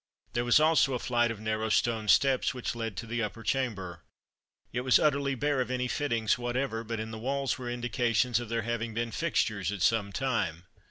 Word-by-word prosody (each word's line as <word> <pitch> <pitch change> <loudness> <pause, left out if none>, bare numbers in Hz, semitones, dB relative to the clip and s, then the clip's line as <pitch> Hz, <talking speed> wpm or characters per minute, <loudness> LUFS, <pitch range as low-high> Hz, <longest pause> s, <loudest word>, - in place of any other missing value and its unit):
There 120 0 0
was 120 +4 +5
also 155 -4 +4
a - - +1
flight 120 -1 +1
of 115 -2 -5
narrow 110 0 -1
stone 110 -1 +1
steps 135 +4 +3
which 125 - -3
led 115 -5 -4
to 115 - -4
the 115 +1 -2
upper 115 +1 -4
chamber. 100 -7 -2 0.7
It 125 - -1
was 130 0 +5
utterly 140 -2 +1
bare 145 +1 0
of 125 - -3
any 125 0 -1
fittings 120 -5 0
whatever; 120 -1 -2
but 115 0 -4
in 110 0 -5
the 110 - -6
walls 135 +3 -1
were 125 -1 -5
indications 120 -1 +1
of 120 -2 -7
there 115 -1 -1
having 115 -1 -3
been 115 0 -2
fixtures 110 - 0
at 100 -4 -3
some 105 -3 +2
time. 100 - -1
120 Hz, 205 wpm, -29 LUFS, 110-130 Hz, 0.7 s, was